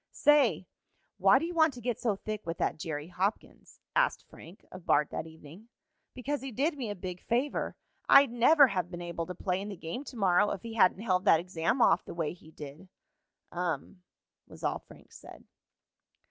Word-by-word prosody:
"Say, 275 - +3 0.5
why 195 +6 +6
do 305 - -1
you 345 - -5
want 315 -4 +3
to - - -9
get 240 -1 -3
so 220 -4 0
thick 215 +1 -6
with 165 0 -5
that - - -1
Jerry 155 0 -5
Hopkins?" 190 +4 -4 0.2
asked - - +1
Frank 175 +5 -15
of 185 -1 -10
Bart 145 0 +3
that 160 - -4
evening. 160 +7 -14 0.5
"Because 275 +3 -3
he 270 0 -6
did 290 +8 0
me 250 -6 -4
a 205 - -4
big 180 -1 -7
favor. 250 +5 -1 0.3
I'd 275 -3 +7
never 280 +5 +6
have 180 -4 -2
been 175 -1 -7
able 170 -1 -4
to 180 - -6
play 185 +2 -2
in 205 - -6
the 200 - -7
game 170 - -6
to 255 - -9
morrow 195 0 +3
if 190 - -5
he 230 -1 -7
hadn't 195 -3 +3
held 185 -3 +1
that 165 - +6
exam 175 +7 0
off - - +4
the - - -9
way 165 -2 -2
he 170 -3 -17
did." 150 +4 -11 0.6
"Um," 180 +1 -4 0.5
was - - -14
all - - -1
Frank - - -18
said. - - -13
195 Hz, 200 wpm, -30 LUFS, 170-245 Hz, 0.6 s, I'd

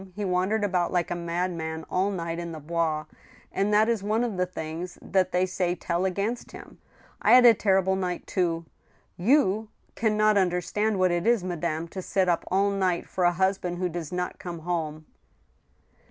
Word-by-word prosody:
He 205 0 -3
wandered 190 +4 +1
about 180 -3 +1
like 175 -1 0
a - - 0
madman 170 -2 -3
all 190 +2 +1
night 170 -3 -3
in 170 -1 -5
the 160 - -7
Bois, 155 0 -1 0.5
and 200 +2 0
that 210 +1 +4
is 230 -3 +1
one 215 +4 0
of 235 -5 -2
the 180 0 0
things 170 +1 -6
that 185 -1 0
they 180 +1 +2
say 180 -1 -1
tell 175 +1 -1
against 200 +6 -2
him.... - - -12 0.4
I - - +5
had 250 0 +8
a 235 - +9
terrible 190 -2 +2
night 180 -2 -3
too.... 170 -3 -1 0.5
You 220 0 +2 0.2
can 220 -2 0
not 215 -1 +4
un 185 -2 +3
derstand 205 +5 -1
what 185 -1 +3
it 175 +3 0
is, 235 -5 +3
madame, 170 -2 -2
to 190 - -6
sit 190 0 0
up 175 -1 +1
all 200 +2 +2
night 185 -3 0
for 180 - -1
a 175 - +5
husband 190 -1 0
who 180 0 -1
does 170 -3 -5
not 180 0 -3
come 170 -2 -6
home 155 -2 -3
180 Hz, 195 wpm, -26 LUFS, 170-200 Hz, 0.5 s, a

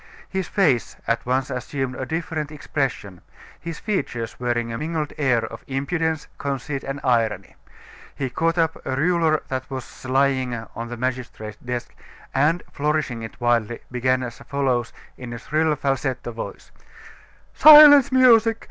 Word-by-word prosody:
His 190 -1 -3
face 150 - +1
at 115 - 0
once 130 +2 0
assumed 130 +1 -3
a 130 - -5
different 160 -1 -3
expression, 135 - -3 0.4
his 165 -1 -6
features 120 - -3
wearing 120 -1 -1
a - - -3
mingled 155 -1 -3
air 130 -6 +1
of 115 - -9
impudence, 160 +3 -2
conceit, 140 0 -3
and 135 +1 -4
irony. 115 -6 0 0.6
He 135 -3 -3
caught 165 +4 0
up 165 -1 0
a 130 - -2
ruler 160 +1 +2
that 130 0 -4
was 130 -2 -8
lying 130 -1 +1 0.2
on 115 0 -5
the 120 0 -7
magistrate's 120 -4 -4
desk, 125 -1 -5 0.4
and, 155 +6 +2
flourishing 150 -5 -1
it 110 +1 -9
wildly, 120 -1 +1
began 130 +1 +1
as 120 -1 -7
follows, 130 -4 -1 0.3
in 125 -1 -7
a - - -5
shrill 155 +5 0
falsetto 135 -3 -2
voice: 115 - -8 0.8
"Silence, 295 -3 +9
music! 230 -3 +5
135 Hz, 145 wpm, -23 LUFS, 120-155 Hz, 0.8 s, Silence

